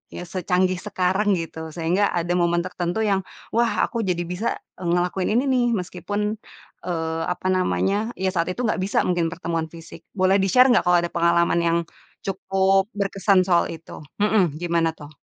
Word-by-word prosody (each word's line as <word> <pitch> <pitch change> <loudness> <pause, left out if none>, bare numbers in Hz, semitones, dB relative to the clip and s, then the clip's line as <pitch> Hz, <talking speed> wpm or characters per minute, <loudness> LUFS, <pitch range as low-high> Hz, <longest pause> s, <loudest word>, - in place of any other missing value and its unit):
yang - - -5
secanggih 185 0 0
sekarang 190 +2 +1
gitu, 160 -1 -6
sehingga 175 +4 +1
ada 175 0 -1
momen 170 0 +2
tertentu 180 +3 -2
yang, 195 -2 +2 0.3
wah, 235 +1 +2
aku 235 - -4
jadi 175 -1 0
bisa 180 +7 -3 0.3
ngelakuin 180 +1 0
ini, 250 - +3
nih, 250 -2 +3
meskipun, 205 +3 -3 0.5
eee, 165 -2 -2
apa 180 +1 -3
namanya, 195 +4 0
ya 190 0 +1
saat 170 -2 0
itu 250 - -5
enggak 220 -3 0
bisa 200 - +1
mungkin 175 -2 +1
pertemuan 170 -2 -2
fisik. 165 -1 -12
Boleh 190 0 +3
di-share 250 +7 +5
enggak 240 - +4
kalau 180 0 +5
ada 175 - -3
pengalaman 170 0 +2
yang 170 - +2 0.5
cukup 195 0 +1
berkesan 195 -1 +2
soal 175 -2 +3
itu? 165 0 -10 0.2
Mhm, 195 -8 +2
gimana 170 -1 +1
tuh? 145 -2 -12
180 Hz, 165 wpm, -23 LUFS, 170-195 Hz, 0.5 s, di-share